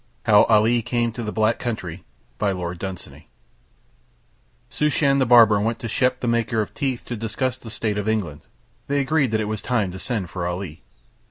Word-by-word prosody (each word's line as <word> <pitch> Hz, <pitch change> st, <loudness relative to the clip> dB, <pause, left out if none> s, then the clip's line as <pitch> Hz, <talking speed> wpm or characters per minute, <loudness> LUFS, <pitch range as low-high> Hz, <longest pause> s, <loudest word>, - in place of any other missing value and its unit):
How 105 Hz, -1 st, +6 dB
Ali 115 Hz, +2 st, +3 dB
Came 120 Hz, +1 st, -1 dB
to 120 Hz, -, -6 dB
the 110 Hz, -2 st, -3 dB
Black 110 Hz, +1 st, +1 dB
Country 95 Hz, -8 st, -5 dB, 0.4 s
Shooshan 90 Hz, -1 st, -4 dB, 2.0 s
the 130 Hz, -, +3 dB
barber 115 Hz, -4 st, +7 dB
went 115 Hz, +2 st, 0 dB
to 115 Hz, -, -6 dB
Shep 125 Hz, +3 st, +1 dB
the 125 Hz, -, -2 dB
maker 115 Hz, -1 st, +1 dB
of 105 Hz, -, -2 dB
teeth 135 Hz, -4 st, -3 dB
to 120 Hz, -, -4 dB
discuss 115 Hz, +3 st, -2 dB
the 115 Hz, -, -10 dB
state 105 Hz, -1 st, -2 dB
of 105 Hz, +1 st, -2 dB
England. 90 Hz, -10 st, -2 dB, 0.5 s
They 140 Hz, 0 st, +1 dB
agreed 140 Hz, -1 st, +1 dB
that 110 Hz, 0 st, 0 dB
it -, -, -1 dB
was 110 Hz, -1 st, -3 dB
time 110 Hz, -7 st, 0 dB
to 95 Hz, -, -8 dB
send 105 Hz, -7 st, -3 dB
for 90 Hz, -2 st, -3 dB
Ali. 90 Hz, -3 st, -5 dB
110 Hz, 175 wpm, -22 LUFS, 100-120 Hz, 2.0 s, barber